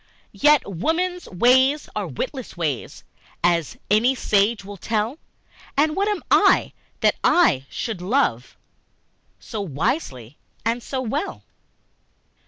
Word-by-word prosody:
Yet 295 -1 +4
women's 335 - -2
ways 260 +9 +3
are - - -2
witless 280 - -5
ways, 150 -8 -3 0.4
As 170 -3 +1
any 235 +5 +4
sage 205 -2 +1
will 200 0 -9
tell, 220 - -2 0.6
And 305 +2 +2
what 400 +1 +1
am 415 -3 -1
I, - - +4 0.3
that - - +3
I 135 - +3
should 225 -7 -4
love 180 - 0 0.8
So 215 - -6
wisely 145 - -3 0.3
and 230 +2 0
so 260 +2 -4
well? 280 - -3
230 Hz, 115 wpm, -22 LUFS, 175-295 Hz, 0.8 s, Yet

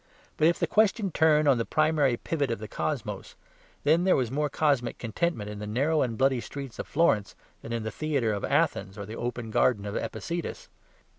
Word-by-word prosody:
But 155 - +4
if 170 - +3
the - - +1
question 215 -2 +2
turn 155 -2 +4
on 135 -4 +4
the - - +1
primary 155 -3 +2
pivot 145 -1 -2
of 115 - -1
the 110 - -7
cosmos, 110 -5 -4 0.5
then 160 +4 +4
there 185 - +4
was 125 -3 0
more 150 +2 0
cosmic 140 -6 +1
contentment 115 0 -2
in 105 0 -6
the 105 - -5
narrow 145 +9 +1
and 115 -3 -1
bloody 130 -2 +2
streets 135 -2 -8
of - - -4
Florence 140 -11 +1 0.3
than 115 - -8
in 115 -1 -2
the 110 - -3
theatre 140 -5 0
of 100 - -4
Athens 95 +1 0
or 100 - -5
the 110 +3 -7
open 120 -2 -4
garden 105 -2 +2
of 100 - -4
Epicurus. 170 - -4
130 Hz, 205 wpm, -27 LUFS, 110-155 Hz, 0.5 s, But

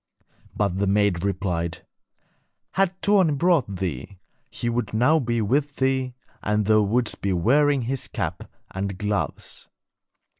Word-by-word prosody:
But 100 -3 0
the 100 - +1
maid 100 -3 +2
replied: 90 -4 -2 0.9
'Had 190 -1 0
Tuoni 190 -8 +3
brought 165 - +2
thee, 90 0 -4 0.3
he 120 - -4
would 120 -2 -1
now 145 +8 +4
be 120 -4 0
with 140 +6 0
thee, 130 -1 0 0.3
and 105 0 0
thou 110 +1 +4
wouldst 115 +3 0
be 100 -1 0
wearing 135 - +3
his 130 +2 -3
cap - - -4 0.2
and 95 0 -4
gloves.' 105 0 -3
110 Hz, 135 wpm, -24 LUFS, 100-135 Hz, 0.9 s, now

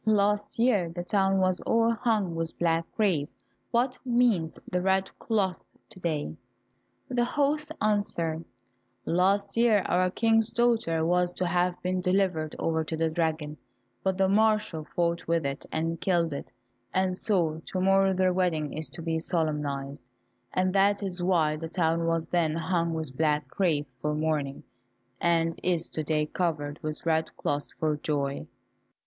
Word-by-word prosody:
Last 210 -1 +1
year 225 -8 +2
the 175 +1 -5
town 195 +1 +2
was 185 -1 +1
all 230 0 +2
hung 215 -6 0
with 165 0 0
black 165 -1 0
crape, 175 -9 +1 0.4
what 250 +2 0
means 235 -10 +2
the 180 - -1
red 190 +1 +1
cloth 200 -5 0 0.3
to 200 - -13
day?" 160 -3 -2 0.7
The 245 -1 +1
host 295 +4 0
answered, 170 -6 0 0.6
"Last 195 +3 +1
year 230 -4 +4
our 185 +1 +2
King's 225 +2 +2
daughter 225 -10 +1
was 180 +1 +2
to 185 - -2
have 175 +1 +1
been 185 0 0
delivered 180 -4 0
over 160 -1 0
to 160 +1 -4
the 160 0 +1
dragon, 155 -2 -1 0.5
but 190 -1 0
the 190 0 +3
marshal 210 -6 +2
fought 170 0 0
with 165 -2 +1
it 140 0 -4
and 165 +1 -2
killed 170 -4 +1
it, 140 - -6 0.4
and 185 -1 +1
so 170 -6 +1
to 185 - -3
morrow 195 +1 +4
their 185 -1 +2
wedding 170 -5 0
is 155 -3 -4
to 165 - -8
be 165 -1 -1
solemnized, 150 -5 -2 0.5
and 185 0 +1
that 200 +1 +3
is 185 -2 -3
why 165 -4 +2
the 165 +1 -6
town 165 -1 +1
was 165 -1 0
then 165 -2 +1
hung 170 0 0
with 155 -5 -4
black 150 0 +1
crape 155 -6 0
for 150 0 -1
mourning, 150 -3 -1 0.6
and 165 -1 +1
is 175 -2 0
to 155 - -2
day 150 0 +1
covered 150 -3 -2
with 155 +1 -5
red 160 -1 0
cloth 145 0 -1
for 155 -1 +1
joy?" 140 -2 -2
175 Hz, 160 wpm, -28 LUFS, 160-195 Hz, 0.7 s, year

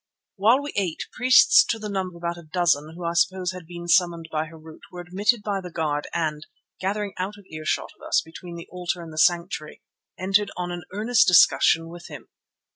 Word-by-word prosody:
While 230 +8 +3
we 290 - -6
ate, 180 -5 -1
priests 255 - +6
to 225 - +1
the 215 -1 -6
number 190 -3 -3
of 170 - -16
about 170 0 -1
a 160 -2 -16
dozen, 160 -3 +1
who 175 0 -7
I 170 - -1
suppose 185 +1 +1
had 180 -3 -10
been 175 0 -8
summoned 170 -1 +2
by 155 0 -1
Harût, 160 0 -13
were 180 - -9
admitted 205 +6 0
by 200 -2 -2
the 180 - -8
guard 150 -3 -2
and, 155 -2 -2 0.3
gathering 200 +1 -2
out 195 +3 -3
of 200 - -16
earshot 155 0 -2
of - - -29
us - - +3
between 170 +2 -10
the 170 - -9
altar 180 -1 -3
and 160 -1 -10
the 155 - -4
sanctuary, 170 -2 0 0.3
entered 195 +2 +1
on 180 0 -3
an 175 0 -6
earnest 220 +5 +2
discussion 165 -1 +5
with 175 +1 -10
him. - - -11
175 Hz, 205 wpm, -24 LUFS, 165-195 Hz, 0.3 s, priests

